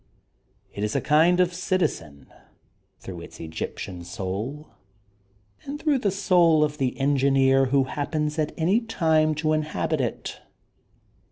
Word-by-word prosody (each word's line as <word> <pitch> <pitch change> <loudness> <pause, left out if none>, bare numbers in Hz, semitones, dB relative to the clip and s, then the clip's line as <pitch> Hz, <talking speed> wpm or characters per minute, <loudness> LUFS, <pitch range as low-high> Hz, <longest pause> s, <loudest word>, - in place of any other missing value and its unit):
It 100 - -4
is 105 - -2
a - - +3
kind 165 +4 +3
of 180 -1 +2
citizen, 150 - -2 0.7
through 90 -3 -9
its - - -12
Egyptian 85 +3 -6
sonl^ 105 - -5 1.0
and 285 +1 -6
through 300 -4 +1
the 210 - +1
soul 180 -5 +3
of 150 0 -2
the 130 -1 -1
engineer 135 -1 +3
who 135 +1 +3
hap 145 +4 -5
pens 150 0 -1
at 155 -1 0
any 180 +7 +2
time 160 -9 +1
to 155 0 0
inhabit 155 -1 -1
it. 120 - -4
150 Hz, 140 wpm, -25 LUFS, 130-170 Hz, 1.0 s, a